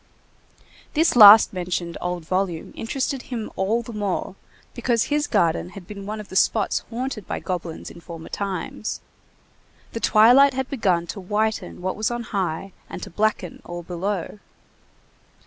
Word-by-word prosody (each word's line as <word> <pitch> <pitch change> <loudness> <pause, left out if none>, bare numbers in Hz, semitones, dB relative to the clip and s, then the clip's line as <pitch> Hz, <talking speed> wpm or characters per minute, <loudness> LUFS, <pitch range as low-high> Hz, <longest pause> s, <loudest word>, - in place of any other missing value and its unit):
This 320 -1 +3
last 215 -2 +10
mentioned 175 -2 -3
old 180 -2 -3
volume 185 -2 -2
interested 260 +3 -2
him 235 -5 -6
all 220 +5 0
the 235 - -9
more, 205 -3 -2 0.4
because 240 -1 +1
his 295 0 0
garden 170 -4 +1
had 185 - -9
been 200 +1 -9
one 215 +1 -4
of 210 - -9
the - - -9
spots 205 +2 +2
haunted 240 -2 -4
by - - -3
goblins 175 -3 -5
in 170 - -13
former 165 -1 -9
times. 200 +2 -4 0.9
The 230 - -4
twilight 250 +6 +6
had 265 0 -3
begun 185 -10 +1
to 195 - -6
whiten 210 0 -2
what 185 - -1
was 215 0 0
on 240 0 -3
high 195 -4 -3 0.2
and - - -7
to 195 - -8
blacken 210 -2 -1
all 175 0 -7
below. 185 +3 -4
205 Hz, 155 wpm, -23 LUFS, 180-230 Hz, 0.9 s, last